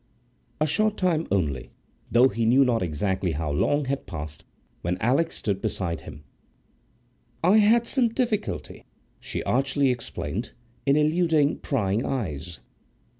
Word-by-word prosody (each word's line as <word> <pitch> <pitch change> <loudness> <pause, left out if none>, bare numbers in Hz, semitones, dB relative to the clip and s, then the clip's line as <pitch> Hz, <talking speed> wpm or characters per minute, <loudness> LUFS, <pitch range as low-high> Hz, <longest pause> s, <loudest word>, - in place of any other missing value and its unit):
A 155 - +3
short 215 +7 +1
time 170 -3 +1
only, 70 -9 -1 0.4
though 125 +3 +6
he 115 -2 -1
knew 135 +4 +5
not 120 -3 +1
exactly 90 +2 -1
how 75 0 -2
long, 145 - +1
had 140 +1 -3
passed 75 -2 -7 0.4
when 90 +1 -1
Alix 140 - +1
stood 100 -2 -2
beside 85 -4 -2
him."I 120 - -5
had 225 +3 +5
some 250 0 +2
difficulty," 230 -3 -2 0.4
she - - -4
archly 135 +1 +1
explained, 115 - -4 0.3
"in 140 - +5
eluding 155 -1 +2
prying 110 -4 0
eyes." 85 - -4
125 Hz, 125 wpm, -25 LUFS, -, 0.4 s, though